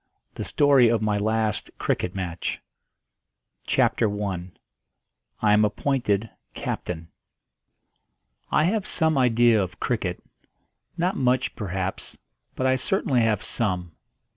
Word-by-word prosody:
THE - - -5
STORY 140 -5 +4
OF 115 -2 +1
MY 105 -1 +1
LAST 110 0 0
CRICKET 90 - -1
MATCH. 90 -3 -3 1.1
CHAPTER 110 - +2
I. 90 -3 -3 0.9
I 105 -1 +5
AM 105 +1 +5
APPOINTED 110 -1 0 0.3
CAPTAIN. 80 -2 -4 1.4
I 150 - +3
have 195 +4 0
some 160 -2 +2
idea 120 -4 +4
of 95 -2 -5
cricket 100 -7 -2 0.7
not 180 +3 0
much, 130 0 +1
perhaps, 95 -3 -4 0.4
but 130 - -1
I 130 0 +3
certainly 130 -3 +1
have 110 -3 +1
some. 90 -6 -2
110 Hz, 115 wpm, -25 LUFS, 95-130 Hz, 1.4 s, I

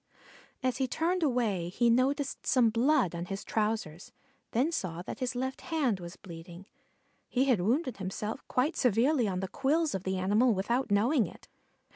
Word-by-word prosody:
As 255 -1 0
he 265 -1 0
turned 350 +6 0
away 230 - 0
he 235 +6 +2
noticed 270 +3 0
some 240 -4 +4
blood 245 - +2
on 170 0 -4
his 195 +2 -5
trousers, 210 -7 -2 0.4
then 265 +8 +1
saw 175 - -3
that - - -7
his 255 -1 -2
left 260 +1 -3
hand 275 - 0
was 175 0 -8
bleeding. 170 +1 -11 0.6
He 260 +1 +2
had 245 -9 +3
wounded 255 - 0
himself 200 +3 -4
quite 275 +7 +1
severely 250 +2 +2
on 185 -1 -2
the 190 - -2
quills 290 - +1
of 190 - -2
the 190 0 -2
animal 210 +5 +3
without 235 +7 0
knowing 220 - +3
it. - - -14
235 Hz, 170 wpm, -30 LUFS, 190-265 Hz, 0.6 s, some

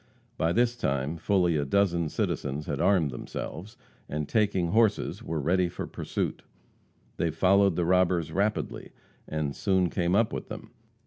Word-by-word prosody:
By 80 +1 +1
this 120 +4 +2
time 70 - -1
fully 90 -2 +2
a 75 - +1
dozen 85 +1 +1
citizens 70 0 -2
had - - -3
armed 85 -8 +3
themselves, 95 - -7 0.3
and 75 0 -3
taking 100 -6 +1
horses, 110 +2 +2
were 80 -1 -3
ready 90 +4 +2
for - - -5
pursuit. - - -3 0.8
They 85 - +1
followed 95 +3 +3
the 85 - 0
robbers 90 -2 +2
rapidly, 105 +2 -2 0.3
and 75 -3 -2
soon 95 -3 +1
came 90 0 +1
up 110 +1 +2
with - - -5
them. - - -8
90 Hz, 150 wpm, -28 LUFS, 80-100 Hz, 0.8 s, armed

